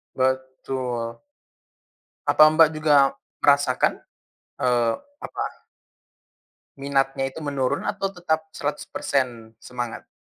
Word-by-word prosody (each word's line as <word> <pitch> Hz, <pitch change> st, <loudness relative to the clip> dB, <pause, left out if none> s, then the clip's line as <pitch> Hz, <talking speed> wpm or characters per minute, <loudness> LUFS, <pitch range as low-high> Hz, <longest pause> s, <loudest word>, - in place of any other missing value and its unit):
Betul. 130 Hz, -2 st, -2 dB, 1.1 s
Apa 155 Hz, -, +7 dB
Mbak 160 Hz, -1 st, +7 dB
juga 145 Hz, -3 st, +4 dB, 0.3 s
merasakan? 140 Hz, -3 st, +3 dB, 0.6 s
eee, 120 Hz, -2 st, +2 dB, 0.3 s
apa -, -, -5 dB, 1.1 s
minatnya 135 Hz, -1 st, 0 dB
itu 135 Hz, -, -8 dB
menurun 140 Hz, -3 st, -1 dB
atau 195 Hz, -1 st, -1 dB
tetap 160 Hz, -2 st, -1 dB
100% 130 Hz, -5 st, -2 dB
semangat? 120 Hz, -2 st, -6 dB
135 Hz, 80 wpm, -24 LUFS, 125-145 Hz, 1.1 s, Apa